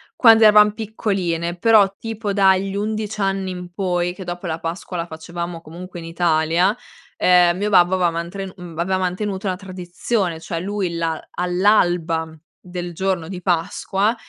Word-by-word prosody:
quando 225 -2 +7
eravam 210 -1 +7
piccoline, 190 -6 -2
però, 200 -1 +4
tipo 225 -2 -4
dagli 195 -1 +3
11 215 +1 -3
anni 195 -1 -1
in 180 -1 -8
poi, 180 -2 -1
che 190 - -9
dopo 175 +1 -6
la 165 -1 -3
Pasqua 170 +2 -5
la 170 0 -3
facevamo 170 +1 -6
comunque 175 +3 -10
in 165 - -9
Italia, 165 +3 +2 0.4
ehm, 180 -1 +4
mio 205 +2 -1
babbo 180 -1 +5
aveva 180 -2 +2
mantre 170 +4 -4
mhmm, 175 -4 -10
aveva 185 +3 0
mantenuto 190 +2 -2
una 185 - 0
tradizione, 185 0 -3
cioè, 165 0 -4
lui 190 -1 -2
la 165 -1 -1
all'alba 175 -3 +1 0.3
del 175 -1 -6
giorno 185 -2 -1
di 180 0 -7
Pasqua 195 +4 0
180 Hz, 155 wpm, -21 LUFS, 170-200 Hz, 0.4 s, quando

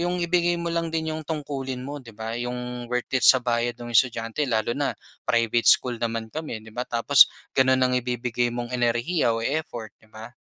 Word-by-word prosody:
'yong 175 +1 -1
ibigay 175 0 +2
mo 170 0 -3
lang 165 0 -1
din 160 -1 -2
'yong 155 - -5
tungkulin 135 -5 -4
mo, 145 +2 -6
'di 115 -3 -13
ba? 110 +1 -5
'Yong 125 0 -5
worth 125 0 -2
it - - 0
sa 130 - +8
bayad 120 -1 -1
ng 120 0 -7
estudyante. 115 +3 +2
Lalo 110 0 0
na 145 -1 0 0.4
private 115 -1 +2
school 125 -2 +4
naman 115 -1 -2
kami 155 -8 -5
'di 110 - -13
ba 120 +3 -3
tapos 125 +4 +6 0.3
gano'n 130 0 +4
ang 125 - +1
ibibigay 120 0 -1
mong 120 0 -5
enerhiya 120 +4 +1
o - - -3
effort, 130 -7 -3
'di 110 - -23
ba? 110 +2 -10
125 Hz, 200 wpm, -25 LUFS, 115-145 Hz, 0.4 s, sa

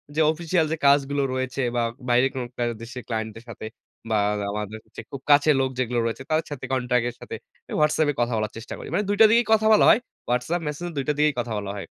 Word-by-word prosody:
যে, 160 - +2
official 165 0 0
যে, - - +1
কাজগুলো 140 0 +3
রয়েছে 130 +1 -2
বা 120 - +2 0.3
বাইরে 125 +2 +4
কোন 130 -2 -3 0.2
কাজ 120 0 +1
দেশের 120 +1 -8
client 110 -1 -2
দের 115 - -11
সাথে 110 - -8 0.4
বা 110 - +2 0.3
আমাদের 105 +1 -4
হচ্ছে - - -10
খুব 135 -2 -7
কাছের 145 0 +5
লোক 130 - +1
যেগুলো 120 -1 0
রয়েছে 115 +3 -3
তাদের 155 +1 +2
সাথে 145 - -5
contact 125 -2 +1
এর 120 - -10
সাথে - - -7 0.5
WhatsApp 150 0 +3
এ - - -6
কথা 120 0 0
বলার 110 0 -2
চেষ্টা 115 - -8
করি। - - -9
মানে 210 - +1
২ 205 - +1
টা - - +11
দিয়েই 235 +1 +4
কথা 220 0 +3
বলা - - +6
হয়। 225 - +6 0.3
WhatsApp, 140 +8 0
Messenger 150 -1 -4
টার 150 - +1
দিয়েই 150 -1 +3
কথা 115 -2 -3
বলা 100 -1 -4
হয়। - - -7
130 Hz, 230 wpm, -24 LUFS, 120-155 Hz, 0.5 s, টা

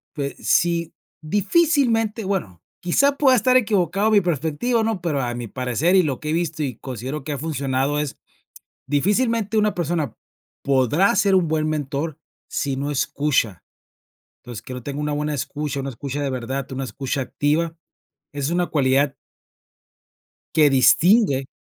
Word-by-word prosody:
pues 140 -2 -3
sí, 170 -1 +1 0.3
difícilmente 225 - +1
bueno, 110 - -3 0.2
quizá 280 +11 +2
pueda 265 -3 +5
estar 255 +2 +3
equivocado 205 -3 +2
mi 210 -2 +5
perspectiva, 175 - 0
¿no? 220 -3 -1
Pero 160 -5 -1
a 120 -1 -2
mi 120 -1 -5
parecer 130 - +1
y 185 - +6
lo 140 -6 -2
que 150 - -4
he - - 0
visto 165 -2 -1
y 130 -6 -3
considero 130 +3 -6
que 150 - -4
ha 145 - -3
funcionado 140 -2 -1
es, 150 -2 -3 0.7
difícilmente 210 - +1
una 210 -1 +2
persona 170 -3 -2 0.5
podrá 140 - +3
ser 195 -1 +3
un 180 -3 +3
buen 155 0 0
mentor 150 0 -3 0.3
si 140 -1 -2
no 140 +2 -3
escucha. 135 -8 0 0.8
Entonces, 120 -4 -9
creo 125 -1 -7
tengo 140 +3 -5
una 150 0 -1
buena 150 +1 -2
escucha, 145 +1 -3
una 135 0 -4
escucha 140 +3 -5
de 140 - -1
verdad, 130 +2 -4
una 135 +1 -3
escucha 135 +1 -3
activa, 155 +5 -1 0.6
es 145 0 -2
una 175 +1 0
cualidad 140 -1 +2 1.4
que 150 -2 +5
distingue 140 - +4
150 Hz, 155 wpm, -22 LUFS, 135-190 Hz, 1.4 s, y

